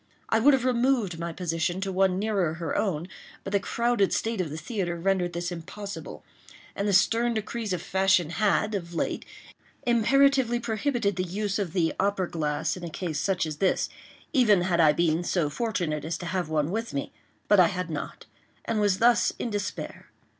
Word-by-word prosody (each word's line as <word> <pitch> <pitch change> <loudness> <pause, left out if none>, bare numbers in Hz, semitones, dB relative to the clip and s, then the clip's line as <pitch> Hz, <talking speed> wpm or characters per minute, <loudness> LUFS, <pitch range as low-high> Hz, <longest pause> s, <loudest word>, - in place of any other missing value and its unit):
I 225 - +3
would 275 +4 +6
have 260 -2 -2
removed 240 -8 +1
my 170 0 -3
position 175 +1 -2
to 195 0 -2
one 190 0 +2
nearer 195 -6 0
her 165 -1 -3
own, 175 -5 -1 0.4
but 195 - -6
the 200 - +4
crowded 235 -1 +1
state 225 -3 0
of 170 - -3
the 150 - -6
theatre 175 -2 -3
rendered 180 -1 0
this 175 +1 -3
impossible; 200 +4 -7 0.5
and 200 - -1
the - - +2
stern 230 +5 +3
decrees 220 0 -3
of 180 -2 -2
Fashion 190 -4 +2
had, 210 +2 +1
of 175 -4 -4
late, - - -2 0.6
imperatively 245 +1 +3
prohibited 225 -3 -1
the 185 - +1
use 200 +3 -2
of 185 -5 -3
the 165 -4 +1
opera 195 -2 +1
glass 150 -3 -1
in 180 - -9
a 170 - -4
case 160 -2 -3
such 185 0 0
as 155 -2 -5
this, 190 +3 +1 0.4
even 220 - +5
had 175 -1 +1
I 155 -2 +6
been 165 +2 +1
so 170 -4 0
fortunate 175 -6 -2
as 160 +2 -3
to 175 - -7
have 175 -1 -2
one 155 0 0
with 225 -5 -3
me—but 195 +7 -1
I 180 - +7
had 180 -1 -3
not—and 210 +7 -6
was 205 -2 +2
thus 235 +1 +4
in 235 - -3
despair. 205 -1 -5
190 Hz, 185 wpm, -27 LUFS, 170-220 Hz, 0.6 s, I